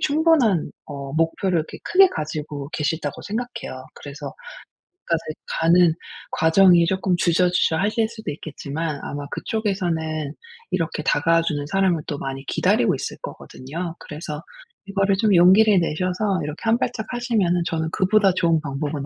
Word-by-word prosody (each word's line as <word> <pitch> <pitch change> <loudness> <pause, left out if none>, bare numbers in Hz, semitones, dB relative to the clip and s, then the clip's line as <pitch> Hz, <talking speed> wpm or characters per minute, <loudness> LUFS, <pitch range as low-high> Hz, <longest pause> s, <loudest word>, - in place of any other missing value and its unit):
충분한 290 - +3 0.2
어 140 -2 -7
목표를 165 +3 +1
이렇게 155 - -5
크게 385 +1 +6
가지고 150 - -5
계시다고 150 0 -2
생각해요. 220 - -5
그래서 145 0 -8 0.7
거기까지 165 -1 0 0.4
가는 170 0 +5 0.4
과정이 170 +1 +5
조금 190 0 +1
주저주저하실 180 +5 +2
수도 220 -8 -6
있겠지만 150 0 -5
아마 145 0 -5
그쪽에서는 165 -8 -2 0.4
이렇게 165 -3 -1
다가와 165 +4 +3
주는 145 -3 -2
사람을 185 -1 +1
또 145 - -3
많이 135 -1 -5
기다리고 - - +2
있을 - - -5
거거든요. 165 +6 -7
그래서 150 0 -7 0.5
이거를 195 0 +1
좀 210 -1 +3
용기를 190 +4 +6
내셔서 185 +4 -1
이렇게 150 +1 -6
한 230 +1 +2
발짝 220 -4 -2
하시면은 220 -8 +1
저는 160 -1 -1
'그보다 195 0 +3
좋은 170 -3 +2
방법은 145 0 -4
170 Hz, 355 characters per minute, -22 LUFS, 150-195 Hz, 0.7 s, 크게